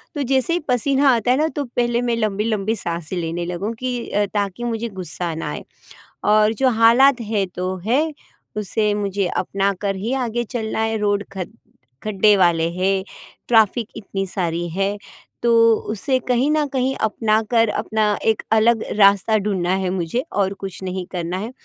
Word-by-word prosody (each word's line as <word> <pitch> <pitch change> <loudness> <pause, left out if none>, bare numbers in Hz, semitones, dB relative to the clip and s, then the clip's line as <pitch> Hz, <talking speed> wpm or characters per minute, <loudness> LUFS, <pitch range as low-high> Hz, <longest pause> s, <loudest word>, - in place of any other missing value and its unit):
तो 290 - -2
जैसे 265 +4 +1
ही 350 - +1
पसीना 270 +2 +2
आता 230 +1 +1
है 255 - +3
ना 310 +2 +2
तो 290 - -1
पहले 240 -1 0
मैं 240 -1 0
लंबी-लंबी 215 0 0
साँसे 170 -3 -4
लेने 170 0 -3
लगूँ 180 +6 -3
की 250 -2 -3
अ, 205 0 +1
ताकि 205 +2 -2
मुझे 235 -1 -2
गुस्सा 180 -3 -4
ना 160 - -4
आए। - - -6 0.6
और 215 +1 +4
जो 260 +3 +2
हालात 240 +3 +5
है 210 -3 -1
तो 185 +1 -4
है, 295 +8 +1 0.4
उसे 210 +1 0
मुझे 200 -2 -1
अपनाकर 195 +2 -1
ही 215 +6 -3
आगे 240 -3 -1
चलना 220 -1 -4
है 225 0 0
रोड 205 -1 0
ख 185 - -1 0.6
खड्डे 210 0 +4
वाले 170 -3 +3
हैं, 190 +2 0 0.4
ट्रैफ़िक 225 0 +3
इतनी 195 -2 -4
सारी 175 -2 -2
है। 195 +4 -1 0.5
तो 235 - +3 0.4
उसे 225 +5 0
कहीं 250 +3 +2
न 305 -1 +2
कहीं 265 0 0
अपनाकर 220 +1 +2
अपना 220 +1 -1 0.2
एक 220 -1 +2
अलग 220 +1 +4 0.2
रास्ता 200 +2 +5
ढूँढना 195 -4 -1
है 185 - 0
मुझे 185 +6 -2
और 195 -1 0
कुछ 195 -1 -7
नहीं 185 0 -4
करना 175 0 -3
है। 215 +5 -5
215 Hz, 170 wpm, -21 LUFS, 190-235 Hz, 0.6 s, हालात